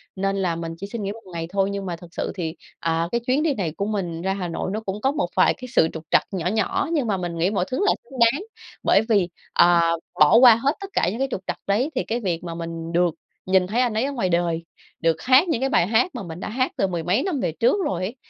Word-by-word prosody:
nên 195 Hz, +1 st, -1 dB
là 180 Hz, -3 st, 0 dB
mình 165 Hz, 0 st, -5 dB
chỉ 200 Hz, +3 st, -6 dB
xin 215 Hz, 0 st, -5 dB
nghỉ 200 Hz, -, -2 dB
1 225 Hz, +1 st, -10 dB
ngày 165 Hz, -1 st, -4 dB
thôi. 195 Hz, 0 st, +1 dB
Nhưng 200 Hz, -1 st, -4 dB
mà 175 Hz, -, -3 dB
thực 170 Hz, 0 st, -14 dB
sự -, -, -3 dB
thì, 165 Hz, -3 st, -4 dB, 0.2 s
ờ, 165 Hz, +1 st, 0 dB
cái 235 Hz, 0 st, 0 dB
chuyến 265 Hz, +4 st, +2 dB
đi 315 Hz, -3 st, +2 dB
này 185 Hz, -, -2 dB
của 200 Hz, -, -1 dB
mình 180 Hz, -6 st, -3 dB
ra 190 Hz, +1 st, 0 dB
Hà 185 Hz, -3 st, -3 dB
Nội 170 Hz, +2 st, -3 dB
nó 215 Hz, -, -1 dB
cũng 205 Hz, -1 st, -5 dB
có 270 Hz, +3 st, +2 dB
một 295 Hz, 0 st, -1 dB
vài -, -, +4 dB
cái 255 Hz, -, -10 dB
sự 160 Hz, -, +5 dB
trục 160 Hz, -, -7 dB
trặc -, -, +5 dB
nhỏ 180 Hz, -3 st, -2 dB
nhỏ 220 Hz, +7 st, 0 dB
nhưng 285 Hz, -7 st, +1 dB
mà 200 Hz, -3 st, +1 dB
mình 175 Hz, -2 st, -4 dB
nghĩ 175 Hz, +4 st, +2 dB
mọi 195 Hz, -4 st, 0 dB
thứ 255 Hz, -, -1 dB
là -, -, +5 dB
xứng 260 Hz, +1 st, -11 dB
đáng. 235 Hz, +10 st, +4 dB, 0.4 s
Bởi 200 Hz, -, +4 dB
vì, 200 Hz, -5 st, +3 dB, 0.2 s
ờ, 175 Hz, 0 st, +5 dB, 0.4 s
bỏ 150 Hz, +7 st, +7 dB
qua 245 Hz, -2 st, +9 dB
hết 270 Hz, +6 st, +1 dB
tất 395 Hz, -, -6 dB
cả 175 Hz, -, +2 dB
những 225 Hz, -, -5 dB
cái 270 Hz, -, +1 dB
trục 190 Hz, -, -3 dB
trặc -, -, -2 dB
đấy 220 Hz, +9 st, +1 dB
thì -, -, 0 dB
cái 230 Hz, +2 st, -2 dB
việc 180 Hz, -6 st, -2 dB
mà 170 Hz, -1 st, -5 dB
mình 165 Hz, 0 st, -5 dB
được 175 Hz, -1 st, +2 dB, 0.3 s
nhìn 185 Hz, -1 st, +3 dB
thấy 225 Hz, +6 st, +1 dB
anh 245 Hz, -3 st, +1 dB
ấy 220 Hz, +2 st, 0 dB
ở 280 Hz, -, -2 dB
ngoài 215 Hz, -9 st, -1 dB
đời, 170 Hz, -1 st, 0 dB, 0.4 s
được 165 Hz, -1 st, +1 dB
hát 260 Hz, +7 st, +5 dB
những 280 Hz, -7 st, 0 dB
cái 270 Hz, -, +1 dB
bài 180 Hz, -9 st, +3 dB
hát 245 Hz, -, +2 dB
mà 235 Hz, -, -5 dB
mình 165 Hz, -1 st, -8 dB
đã -, -, -5 dB
hát 255 Hz, +4 st, 0 dB
từ 195 Hz, -, +2 dB
mười 175 Hz, -3 st, -3 dB
mấy 190 Hz, -, +1 dB
năm 350 Hz, -8 st, -1 dB
về 165 Hz, -, -1 dB
trước 230 Hz, -, +2 dB
rồi 180 Hz, -2 st, -2 dB
ấy, 210 Hz, +7 st, -4 dB
195 Hz, 290 wpm, -23 LUFS, 170-235 Hz, 0.4 s, qua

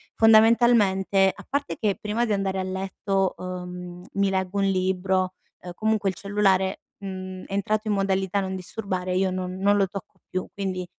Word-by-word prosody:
fondamentalmente 220 Hz, -4 st, +5 dB
a -, -, -13 dB
parte 280 Hz, +1 st, -2 dB
che 205 Hz, -3 st, +1 dB
prima 215 Hz, +3 st, 0 dB
di 215 Hz, -, 0 dB
andare 195 Hz, -1 st, -1 dB
a -, -, -1 dB
letto, 190 Hz, 0 st, -1 dB
uhm, 180 Hz, -1 st, -7 dB
mi 200 Hz, 0 st, +2 dB
leggo 190 Hz, 0 st, -1 dB
un 195 Hz, -, +2 dB
libro, 185 Hz, 0 st, +1 dB, 0.3 s
uhm, 180 Hz, -, -7 dB
comunque 215 Hz, -2 st, +1 dB
il 185 Hz, -, -4 dB
cellulare, 195 Hz, -1 st, +1 dB, 0.2 s
mhmm, 185 Hz, -1 st, -6 dB
è -, -, -9 dB
entrato 215 Hz, +2 st, 0 dB
in 210 Hz, -, +2 dB
modalità 195 Hz, 0 st, +1 dB
non 190 Hz, 0 st, -3 dB
disturbare, 185 Hz, -1 st, -3 dB
io 190 Hz, 0 st, +2 dB
non 185 Hz, 0 st, -3 dB
non 200 Hz, +2 st, +3 dB
lo 195 Hz, -1 st, +3 dB
tocco 195 Hz, 0 st, -9 dB
più. 185 Hz, 0 st, -3 dB
Quindi, 185 Hz, -2 st, -3 dB
190 Hz, 175 wpm, -25 LUFS, 185-200 Hz, 0.3 s, fondamentalmente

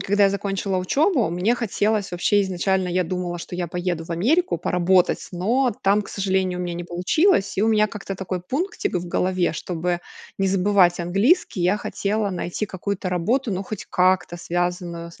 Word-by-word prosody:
Когда 200 Hz, +1 st, +3 dB
я 195 Hz, -, +4 dB
закончила 195 Hz, -1 st, -2 dB
учебу, 275 Hz, -, +2 dB
мне 180 Hz, +8 st, +1 dB
хотелось 215 Hz, -4 st, -1 dB
вообще 205 Hz, +3 st, +2 dB
изначально, 190 Hz, 0 st, 0 dB
я 180 Hz, 0 st, +1 dB
думала, 175 Hz, 0 st, -3 dB
что 175 Hz, -, -8 dB
я 175 Hz, -1 st, -2 dB
поеду 175 Hz, -1 st, -3 dB
в 165 Hz, -, -13 dB
Америку 240 Hz, -, +2 dB
поработать, 180 Hz, +1 st, +2 dB
но 240 Hz, +8 st, +1 dB
там, 200 Hz, +2 st, +4 dB
к -, -, -12 dB
сожалению, 190 Hz, -2 st, -1 dB
у -, -, -2 dB
меня 175 Hz, -1 st, -3 dB
не 175 Hz, 0 st, -5 dB
получилось. 195 Hz, -, +1 dB
И -, -, +3 dB
у 225 Hz, -, +3 dB
меня 215 Hz, -1 st, +4 dB
как-то 200 Hz, -1 st, -6 dB
такой 185 Hz, -1 st, -4 dB
пунктик 300 Hz, -, -3 dB
в 175 Hz, 0 st, -2 dB
голове. 185 Hz, -1 st, +1 dB
Чтобы 175 Hz, +1 st, -2 dB, 0.4 s
не 195 Hz, -, +2 dB
забывать 185 Hz, -2 st, +3 dB
английский 195 Hz, -, +2 dB
я 185 Hz, +4 st, +3 dB
хотела 205 Hz, 0 st, -2 dB
найти 180 Hz, +3 st, -3 dB
какую-то 195 Hz, 0 st, -4 dB
работу, 215 Hz, +7 st, 0 dB
ну 185 Hz, +2 st, -2 dB
хоть 210 Hz, 0 st, -6 dB
как-то 180 Hz, -1 st, +2 dB
связанную 175 Hz, 0 st, -3 dB
с -, -, -17 dB
185 Hz, 180 wpm, -23 LUFS, 175-205 Hz, 0.4 s, я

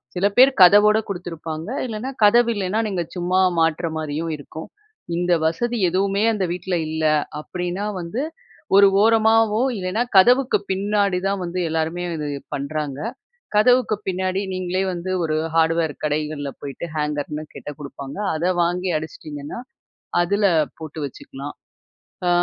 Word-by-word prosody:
சில 180 Hz, -, +1 dB
பேர் 260 Hz, +2 st, +9 dB
கதவோட 210 Hz, +4 st, +7 dB
குடுத்துருப்பாங்க. 165 Hz, -2 st, -6 dB, 0.2 s
இல்லைனா 230 Hz, +2 st, -4 dB
கதவு 235 Hz, +3 st, +6 dB
இல்லைனா, 200 Hz, +2 st, -1 dB
நீங்க 185 Hz, -4 st, -1 dB
சும்மா 180 Hz, +1 st, +1 dB, 0.2 s
மாட்ற 165 Hz, +1 st, +1 dB
மாரியும் 155 Hz, +1 st, -3 dB
இருக்கும். 155 Hz, +2 st, -9 dB, 0.5 s
இந்த 175 Hz, 0 st, +1 dB
வசதி 235 Hz, +9 st, 0 dB
எதுவுமே 195 Hz, +3 st, +1 dB
அந்த 205 Hz, -3 st, -1 dB
வீட்டுல 180 Hz, +1 st, -2 dB
இல்ல, 160 Hz, 0 st, -2 dB, 0.3 s
அப்படினா 180 Hz, +5 st, -4 dB
வந்து 180 Hz, +9 st, -4 dB, 0.6 s
ஒரு 200 Hz, 0 st, +8 dB
ஓரமாவோ 225 Hz, 0 st, +4 dB, 0.2 s
இல்லைனா, 185 Hz, +4 st, -1 dB, 0.2 s
கதவுக்கு 250 Hz, +6 st, +5 dB
பின்னாடி 200 Hz, -1 st, +1 dB
தான் 195 Hz, -1 st, -1 dB
வந்து 180 Hz, +1 st, -3 dB
எல்லாருமே 160 Hz, +2 st, -1 dB
இது 150 Hz, -, -3 dB, 0.3 s
பண்ணுறாங்க. 140 Hz, 0 st, -4 dB, 0.6 s
கதவுக்கு 245 Hz, 0 st, +4 dB
பின்னாடி 185 Hz, 0 st, -1 dB
நீங்களே 185 Hz, +1 st, -1 dB
வந்து 175 Hz, +1 st, -5 dB
ஒரு 155 Hz, -1 st, 0 dB, 0.2 s
ஹார்டுவேர் 165 Hz, -1 st, +2 dB
கடைகள்ல 150 Hz, -1 st, -2 dB
போய்ட்டு, 140 Hz, +4 st, -6 dB
ஹேங்கர்னு 150 Hz, 0 st, -2 dB
கேட்டா 150 Hz, -, -7 dB
குடுப்பாங்க. 140 Hz, 0 st, -8 dB, 0.2 s
அத 180 Hz, +3 st, +1 dB
வாங்கி 180 Hz, +2 st, -1 dB
அடிச்சிட்டிங்கன்னா, 155 Hz, +3 st, -7 dB, 0.6 s
அதுல 200 Hz, +4 st, +2 dB, 0.3 s
போட்டு 155 Hz, 0 st, -7 dB
வச்சுக்கலாம். 140 Hz, +2 st, -9 dB, 0.7 s
அ, -, -, +4 dB
180 Hz, 130 wpm, -22 LUFS, 155-200 Hz, 0.7 s, பேர்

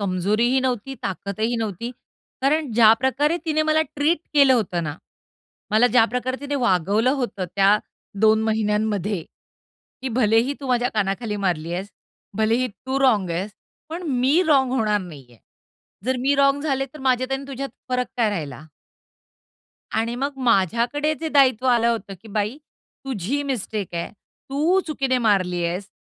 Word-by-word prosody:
कमजोरीही 210 Hz, +7 st, +1 dB
नव्हती, 255 Hz, 0 st, -2 dB
ताकदही 200 Hz, +5 st, -2 dB
नव्हती. 225 Hz, +1 st, -3 dB, 0.5 s
कारण 295 Hz, +1 st, +1 dB
ज्याप्रकारे 260 Hz, +8 st, +4 dB
तिने 310 Hz, -1 st, +1 dB
मला 310 Hz, 0 st, +2 dB
ट्रीट 305 Hz, +4 st, +2 dB, 0.2 s
केलं 280 Hz, -2 st, +6 dB
होतं 185 Hz, -7 st, -1 dB
ना, 150 Hz, +1 st, -4 dB, 0.7 s
मला 220 Hz, +3 st, +5 dB
ज्याप्रकारे 250 Hz, +2 st, +1 dB
तिने 285 Hz, 0 st, -4 dB
वागवलं 205 Hz, +4 st, +2 dB
होतं 200 Hz, -6 st, -3 dB
त्या 200 Hz, +1 st, +5 dB, 0.5 s
2 220 Hz, 0 st, +5 dB
महिन्यांमध्ये 210 Hz, -3 st, 0 dB, 0.8 s
की 265 Hz, -, -2 dB
भलेही 230 Hz, +4 st, +3 dB
तू 275 Hz, -, -6 dB
माझ्या 245 Hz, -1 st, +2 dB
कानाखाली 210 Hz, +1 st, -1 dB
मारली 170 Hz, -2 st, -1 dB
आहेस, 190 Hz, +3 st, -4 dB, 0.5 s
भलेही 225 Hz, +4 st, +1 dB
तू 260 Hz, +5 st, -4 dB
रॉन्ग 215 Hz, -9 st, +3 dB
आहेस 180 Hz, +5 st, -2 dB, 0.4 s
पण 330 Hz, +3 st, -6 dB
मी 265 Hz, +5 st, +3 dB
रॉन्ग 265 Hz, -4 st, +3 dB
होणार 215 Hz, -5 st, +1 dB
नाहीये. 140 Hz, -10 st, -12 dB, 0.7 s
जर 260 Hz, +1 st, 0 dB
मी 275 Hz, +3 st, +2 dB
रॉन्ग 280 Hz, 0 st, +3 dB
झाले, 270 Hz, -3 st, 0 dB
तर 275 Hz, +3 st, -14 dB
माझ्यात 255 Hz, 0 st, +1 dB
आणि 270 Hz, +1 st, -2 dB
तुझ्यात 275 Hz, 0 st, -5 dB, 0.2 s
फरक 250 Hz, 0 st, 0 dB
काय 230 Hz, -3 st, +2 dB
राहिला? 150 Hz, -8 st, -5 dB, 1.3 s
आणि 230 Hz, +2 st, -1 dB
मग 275 Hz, +2 st, -3 dB
माझ्याकडे 235 Hz, -, +2 dB
जे 325 Hz, -, -2 dB
दायित्व 260 Hz, -4 st, +3 dB
आलं 235 Hz, -2 st, +3 dB
होतं, 220 Hz, -4 st, -2 dB
की 225 Hz, -, -13 dB
बाई 210 Hz, +4 st, -2 dB, 0.5 s
तुझी 265 Hz, +2 st, -2 dB
मिस्टेक 220 Hz, -8 st, -3 dB
आहे, 170 Hz, 0 st, -3 dB
तू 300 Hz, -, -1 dB
चुकीने 270 Hz, -4 st, 0 dB
मारली 185 Hz, -6 st, +1 dB
आहेस, 180 Hz, +4 st, -3 dB
235 Hz, 145 wpm, -22 LUFS, 205-270 Hz, 1.3 s, केलं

